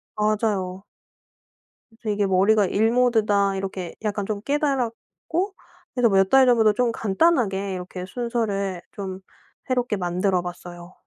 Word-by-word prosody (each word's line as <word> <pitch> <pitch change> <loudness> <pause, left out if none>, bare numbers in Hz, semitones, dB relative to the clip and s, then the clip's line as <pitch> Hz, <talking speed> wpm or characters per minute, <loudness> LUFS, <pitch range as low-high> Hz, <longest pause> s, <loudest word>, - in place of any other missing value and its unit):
맞아요. 210 -3 -1 1.1
그래서 225 -1 -8
이게 205 0 +1
'머리가 200 +2 +4
일 220 +5 +2
모드다.' 215 -5 +2
이렇게 190 -2 -5
약간 205 -1 -2
좀 205 0 -3
깨달았고 290 - -2 0.4
그래서 245 -3 +3
몇 195 -1 +3
달 270 -1 +6
전부터 225 -4 +4
좀 240 +1 +1
간단하게 200 - +1
이렇게 180 0 -6
순서를 200 -5 -2
좀 190 -2 -6 0.5
새롭게 245 -4 0
만들어 180 0 0
봤어요. 175 0 -9
205 Hz, 295 characters per minute, -23 LUFS, 190-235 Hz, 1.1 s, 달